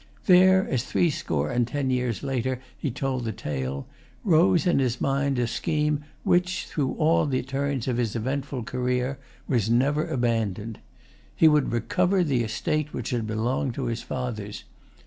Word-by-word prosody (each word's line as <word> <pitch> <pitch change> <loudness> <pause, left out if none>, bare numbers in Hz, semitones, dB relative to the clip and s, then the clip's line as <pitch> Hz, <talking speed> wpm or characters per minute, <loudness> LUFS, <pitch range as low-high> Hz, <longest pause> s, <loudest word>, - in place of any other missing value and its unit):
There, 185 0 +6
as 130 - 0
threescore 80 - 0
and 120 -1 +1
ten 140 -1 -1
years 125 -3 -1
later 130 -2 -1 0.2
he 145 - -3
told 130 0 -2
the 115 - -2
tale, 70 - -4 0.4
rose 175 -1 +4
in 175 -5 +3
his 125 -2 0
mind 140 0 0
a 120 - +2
scheme 150 +4 -1 0.2
which, 180 +1 +1
through 140 -4 -2
all 155 0 +2
the 130 -2 0
turns 135 -1 -2
of 125 -2 0
his 120 -3 -1
eventful 130 +2 -2
career, 125 +3 -1 0.3
was 115 -5 +1
never 140 +6 +2
abandoned. 115 -3 -1 0.6
He 160 - +6
would 150 -2 +3
recover 180 - +1
the 135 -7 +1
estate 150 +7 -2
which - - -4
had 115 -3 -1
belonged 115 +3 -1
to 135 - -3
his 115 -1 -2
fathers. 110 -5 -5
130 Hz, 160 wpm, -26 LUFS, 115-150 Hz, 0.6 s, There